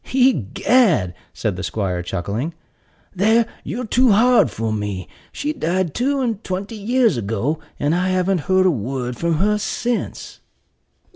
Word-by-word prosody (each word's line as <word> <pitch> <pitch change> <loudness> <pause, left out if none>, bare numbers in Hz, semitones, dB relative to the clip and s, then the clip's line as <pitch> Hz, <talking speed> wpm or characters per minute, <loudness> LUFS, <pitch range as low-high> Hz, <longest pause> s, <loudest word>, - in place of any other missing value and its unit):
"Egad," 220 - +3 0.2
said 105 -5 -2
the - - -4
'squire, 95 -3 -2
chuckling, 105 - -3 0.6
"there 220 +5 +4 0.2
you're 245 +3 -4
too 250 +2 +3
hard 240 - +5
for 110 +1 -3
me; 100 -4 -3 0.3
for - - -28
she 300 +1 -1
died 180 - -1
two 275 +2 0
and 230 -4 -2
twenty 190 +4 -4
years 225 - +2
ago, 115 +8 -1 0.2
and 145 +2 +1
I 180 +2 +1
haven't 185 0 +1
heard 185 0 +4
a 185 - +5
word 125 0 -3
from 170 +5 0
her 210 +6 +2
since." 240 +3 -3
185 Hz, 150 wpm, -20 LUFS, -, 0.6 s, hard